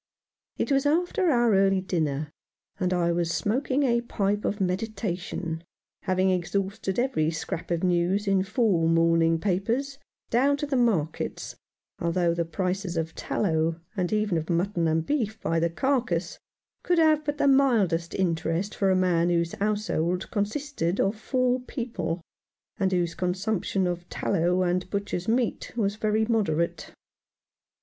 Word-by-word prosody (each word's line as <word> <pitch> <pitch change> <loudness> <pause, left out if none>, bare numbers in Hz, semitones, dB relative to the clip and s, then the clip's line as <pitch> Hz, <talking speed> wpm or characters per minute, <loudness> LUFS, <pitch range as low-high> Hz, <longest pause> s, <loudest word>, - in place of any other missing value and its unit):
It - - -1
was 275 +1 +3
after 355 +4 +2
our 240 -5 +3
early 195 0 +4
dinner, 155 -5 -2 0.5
and 185 -2 0
I 175 -1 +2
was 170 -1 0
smoking 250 - 0
the 235 -4 +2
pipe 205 -3 -1
of 205 - -1
meditation, 185 -4 -3 0.4
having 185 0 +2
exhausted 190 +2 -2
every 240 -11 +1
scrap 165 0 -4
of 170 0 -1
news 180 +3 +1
in 195 -1 +3
four 195 -5 +1
morning 165 0 +3
papers 230 +10 -1
— - - -57
down 275 +4 +3
to 295 - -2
the 285 -2 -2
markets, 205 - 0 0.4
although 170 0 +1
the 170 0 -1
prices 185 +1 -2
of 160 0 -2
tallow, 160 -3 -1 0.2
and 180 -3 -1
even 210 -5 +1
of 160 - -7
mutton 170 0 +1
and 160 0 +1
beef 225 -7 -1
by 165 -3 0
the 170 +1 +1
carcase, 190 -5 -1 0.4
could 355 - +1
have 310 -2 +4
but 295 0 -2
the 285 - +2
mildest 220 -12 +3
interest 175 +1 -1
for 195 - +1
a 190 - +4
man 175 -2 +2
whose 170 -1 +1
household 200 -4 -1
consisted 210 - -2
of 195 +3 +2
four 255 +3 0
people, 215 -10 -4 0.6
and 190 -2 +1
whose 175 -2 0
consumption 190 +1 -1
of 175 0 -3
tallow 180 +2 +1
and 180 +1 0
butcher's 200 -3 -3
meat 235 0 0
was 205 -3 +1
very 215 0 +1
moderate. 180 -8 0
190 Hz, 150 wpm, -26 LUFS, 170-225 Hz, 0.6 s, early